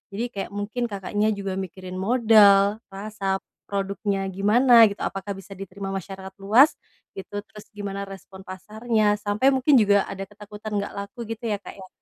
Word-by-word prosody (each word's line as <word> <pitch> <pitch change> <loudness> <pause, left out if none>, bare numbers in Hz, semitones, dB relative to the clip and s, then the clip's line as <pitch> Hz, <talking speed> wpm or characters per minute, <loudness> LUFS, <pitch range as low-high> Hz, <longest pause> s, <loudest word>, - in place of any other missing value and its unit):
Jadi 240 +3 -3
kayak 195 - -5
mungkin 220 +4 -2
Kakaknya 205 +1 -2
juga 195 -1 -4
mikirin 185 0 -7
modal, 210 -2 +5
rasa 195 0 -3 0.3
produknya 200 0 -2
gimana, 230 +5 +6
gitu, 200 - -7
apakah 195 +1 -4
bisa 195 +1 -13
diterima 195 0 -7
masyarakat 190 0 -6
luas, 225 +10 +6 0.5
gitu. 205 +1 -6
Terus 210 -1 -14
gimana 200 -1 -5
respon 190 0 -12
pasarnya, 215 +2 0
sampai 210 +6 +2
mungkin 270 +2 +3
juga 205 -4 +4
ada 195 0 -6
ketakutan 210 +1 -7
nggak 200 - -5
laku 200 +4 -7
gitu 235 - -31
ya 205 - 0
Kak - - -10
ya? - - -12
205 Hz, 160 wpm, -24 LUFS, 195-215 Hz, 0.5 s, gimana